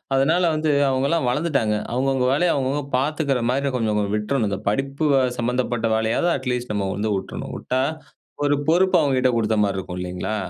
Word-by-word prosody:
அதனால 160 +7 +2
வந்து 155 0 +1 0.2
அவுங்களலாம் 135 +3 +1
வளர்ந்துட்டாங்க. 135 -6 0 0.2
அவுங்கவுங்க 130 0 +1
வேலைய 170 +5 +2
அவுங்கவுங்க 140 +1 -1
பார்த்துக்கிறமாரி 135 -2 0
கொஞ்சம், 110 -3 0
கொஞ்சம் 100 0 -1
விட்ரணும். 110 +2 -1
இந்த 100 - -3
படிப்பு 135 +7 -1 0.3
சம்மந்தப்பட்ட 120 -1 -1
வேலையாவது 110 +10 +1
அட்லீஸ்ட் 125 -3 -3
நம்ம 100 -2 -1
வந்து 105 +1 -1
விட்ரணும் 95 - -6
விட்டா 130 +1 -1 0.6
ஒரு 145 0 +3
பொறுப்பு 180 +4 +3
அவுங்ககிட்ட 130 -4 +2
குடுத்தமாரி 105 -3 +1
இருக்கும் 90 -1 -5
இல்லேங்களா! 90 +4 -3
130 Hz, 150 wpm, -22 LUFS, 110-140 Hz, 0.6 s, ஒரு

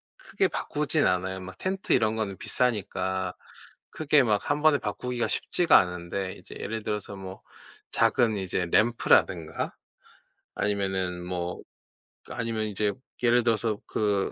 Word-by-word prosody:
크게 - - 0
바꾸진 150 +1 0
않아요. 95 +1 0
막 95 0 -9
텐트 190 +1 -3
이런 110 -2 +3
거는 105 -4 -3
비싸니까. 95 -6 -1 0.6
크게 150 -2 +3
막 105 -4 +1
1 145 +1 +1
번에 155 -2 +5
바꾸기가 125 -1 -2
쉽지가 175 -2 +4
않은데 90 +1 -2
이제 - - -13
예를 110 +1 -3
들어서 105 -1 -3
뭐 95 0 -9 0.5
작은 115 -3 +3
이제 95 -2 -1
램프라든가 95 -6 +2 0.8
아니면은 95 -3 -1
뭐 90 -1 -3 0.7
아니면 115 -2 -2
이제 105 0 0 0.3
예를 120 0 +4
들어서 110 -2 +1
그 100 -2 0
105 Hz, 280 characters per minute, -27 LUFS, 95-120 Hz, 0.8 s, 번에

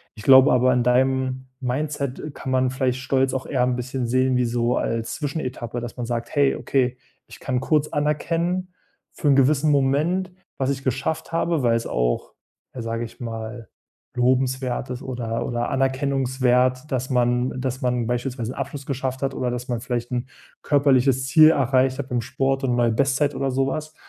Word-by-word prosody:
Ich 105 - -11
glaube 130 +1 +7
aber 125 0 +4
an 125 -1 +2
deinem 130 +1 +1
Mindset, 140 +1 -2
äh, 150 - -6
kann 130 - -6
man 130 0 +2
vielleicht 130 -1 -1
stolz 135 0 +1
auch 130 - -3
eher 130 -3 +1
ein 125 0 +1
bisschen 125 +1 -3
sehen 130 +1 +2
wie 125 - +2
so 120 +1 0
als 115 0 -2
Zwischenetappe, 130 -5 -4
dass 120 +1 -7
man 120 - -3
sagt: 115 0 -3
„Hey, 140 -1 +3
okay, 125 -2 0 0.3
ich - - -13
kann 125 -2 -1
kurz 150 +1 +1
anerkennen, 170 +5 -1 0.4
für 155 - -3
'n 140 - +6
gewissen 145 +2 +3
Moment, 150 +7 +1 0.3
was 130 - 0
ich 135 0 -4
geschafft 130 +6 -2
habe", 165 -3 0
weil 115 -1 +3
es 115 - -2
auch, - - -1 0.4
ja, 125 - -5
sage 115 0 -3
ich 115 +1 -13
mal, 115 0 -6 0.5
lobenswert 130 0 0
ist 125 0 -5
oder 120 -2 -3
oder 120 0 -2
anerkennungswert, 130 0 +1
dass 130 0 -2
man 125 0 +2
äh, 130 - -6
dass 130 0 -3
man 125 -2 0
beispielsweise 120 -1 -2
'nen - - -8
Abschluss 140 -2 -5
geschafft 130 -1 -3
hat 135 -1 -1
oder 125 -1 -1
dass 125 0 -5
man 120 -2 -2
vielleicht 120 0 -3
'n 125 0 -2 0.4
körperliches 135 -2 +3
Ziel 155 +2 +7
erreicht 130 -2 +2
hat 135 - -4
beim 120 -1 0
Sport 135 +2 -1
und 125 -2 +1
neue 120 -1 +2
Bestzeit 140 +4 +1
oder 135 -1 -1
sowas. 135 +4 -2
130 Hz, 185 wpm, -23 LUFS, 125-135 Hz, 0.5 s, glaube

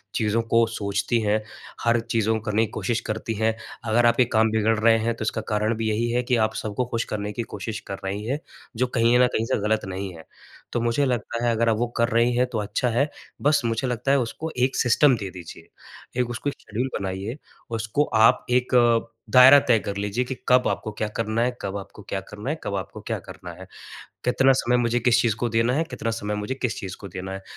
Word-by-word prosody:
चीज़ों 110 +1 +1
को 115 0 +6
सोचती 100 +3 0
हैं, 105 +1 +1 0.4
हर 120 0 +3
चीज़ों 110 -1 0
को - - -6
करने 110 +1 +2
की 110 - -11
कोशिश 120 -2 -1
करती 110 +1 -2
हैं। 110 +1 0 0.3
अगर 120 +2 +3
आपके 120 +1 +4
काम 110 0 +4
बिगड़ 110 0 +2
रहे 115 +1 +5
हैं 115 +1 0
तो 110 - -5
इसका 110 +1 -1
कारण 105 +2 0
भी 110 -1 -1
यही 115 +2 0
है 125 +1 +1
कि 125 0 +1
आप 110 - -4
सबको 110 +4 -2
खुश 115 -1 -2
करने 105 0 -3
की 120 - -3
कोशिश 105 +2 -5
कर 100 - -4
रही 100 +2 -3
हैं, 135 +6 -1 0.4
जो 125 +3 +1
कहीं 120 0 +3
न 125 - +6
कहीं 110 - 0
से - - 0
ग़लत 110 -1 +1
नहीं 95 0 -5
है। 80 - -12 0.5
तो - - +1
मुझे 120 +4 +1
लगता 120 -2 -2
है 120 - +3
अगर 115 0 +2
आप 110 - +2
वो 120 +2 0
कर 115 +1 +2
रही 115 +1 +3
हैं 125 - +3
तो 115 - -2
अच्छा 105 +4 -1
है, 135 +6 +1 0.3
बस 145 0 +3
मुझे 115 +3 0
लगता 125 +2 -1
है 140 - +4
उसको 145 +7 -4
एक 130 +2 +1
सिस्टम 130 +2 +4
दे 100 -3 -5
दीजिए 90 -3 -11 0.5
एक 120 - -2
उसको 120 +4 -2
शेड्यूल 125 +1 -4
बनाइए, 100 +6 -4 0.3
उसको 115 +5 0 0.2
आप - - +5
एक 125 +1 +2 0.6
दायरा 130 +4 +9
तय - - +5
कर 100 -1 -5
लीजिए 105 +5 -1
कि 130 +1 -4
कब 125 0 +4
आपको 110 - -2
क्या 105 0 -3
करना 115 0 0
है, 125 0 -1
कब 100 +1 -3
आपको 100 +1 -10
क्या 95 - -1
करना 105 +5 -6
है, 155 - 0
कब 100 - -3
आपको 95 -3 -6
क्या - - -2
करना - - -9
है। - - -10 0.6
कितना 135 +2 +4
समय 125 -1 +1
मुझे 120 0 +1
किस 125 0 +4
चीज़ 115 -4 +2
को 120 0 -1
देना 115 +2 +2
है, 160 +3 +1
कितना 115 -8 -4
समय 105 -2 -3
मुझे 105 +5 -3
किस 125 -4 -3
चीज़ 95 -2 -6
को 100 - -8
देना 95 +1 -6
है, 95 0 -6
115 Hz, 235 wpm, -24 LUFS, 105-125 Hz, 0.6 s, दायरा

